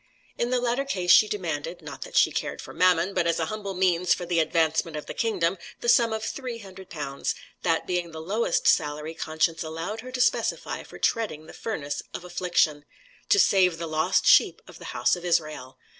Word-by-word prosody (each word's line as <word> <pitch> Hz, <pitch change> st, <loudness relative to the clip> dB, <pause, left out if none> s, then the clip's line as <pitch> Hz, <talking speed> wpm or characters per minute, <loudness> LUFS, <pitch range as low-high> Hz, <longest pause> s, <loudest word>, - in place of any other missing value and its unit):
In 240 Hz, -, -1 dB
the 255 Hz, 0 st, +1 dB
latter 245 Hz, +2 st, 0 dB
case 185 Hz, -10 st, 0 dB
she 215 Hz, -, +7 dB
demanded 170 Hz, -4 st, -4 dB
not 145 Hz, -2 st, -9 dB
that -, -, -8 dB
she -, -, +5 dB
cared -, -, -3 dB
for -, -, -9 dB
mammon, 180 Hz, +2 st, +3 dB
but 170 Hz, -, +1 dB
as 170 Hz, -, +1 dB
a 165 Hz, -, 0 dB
humble 200 Hz, -3 st, -5 dB
means 180 Hz, -1 st, +2 dB
for 175 Hz, -, -6 dB
the 170 Hz, -1 st, +1 dB
advancement 160 Hz, 0 st, +1 dB
of 150 Hz, -, -6 dB
the -, -, -6 dB
Kingdom 190 Hz, -6 st, 0 dB, 0.2 s
the -, -, -4 dB
sum 235 Hz, -1 st, +5 dB
of 220 Hz, 0 st, -3 dB
300*l.*; 190 Hz, -, -7 dB, 0.4 s
that 165 Hz, -2 st, +1 dB
being 180 Hz, -2 st, -2 dB
the 160 Hz, -1 st, -8 dB
lowest 195 Hz, +3 st, -1 dB
salary 150 Hz, +1 st, +1 dB
conscience 160 Hz, +1 st, -1 dB
allowed 165 Hz, +7 st, -5 dB
her 255 Hz, +2 st, -9 dB
to 255 Hz, -, -4 dB
specify 250 Hz, -, 0 dB
for -, -, -12 dB
treading 210 Hz, -10 st, -1 dB
the -, -, -12 dB
furnace 145 Hz, -10 st, -4 dB
of -, -, -6 dB
affliction, 175 Hz, -4 st, 0 dB, 0.5 s
to -, -, +5 dB
save 185 Hz, -, +4 dB
the 165 Hz, -, -4 dB
lost 155 Hz, -1 st, +1 dB
sheep -, -, +5 dB
of -, -, -13 dB
the -, -, -10 dB
house 120 Hz, -, +3 dB
of 175 Hz, -, -9 dB
Israel. 155 Hz, -7 st, -1 dB
175 Hz, 200 wpm, -26 LUFS, 160-210 Hz, 0.5 s, she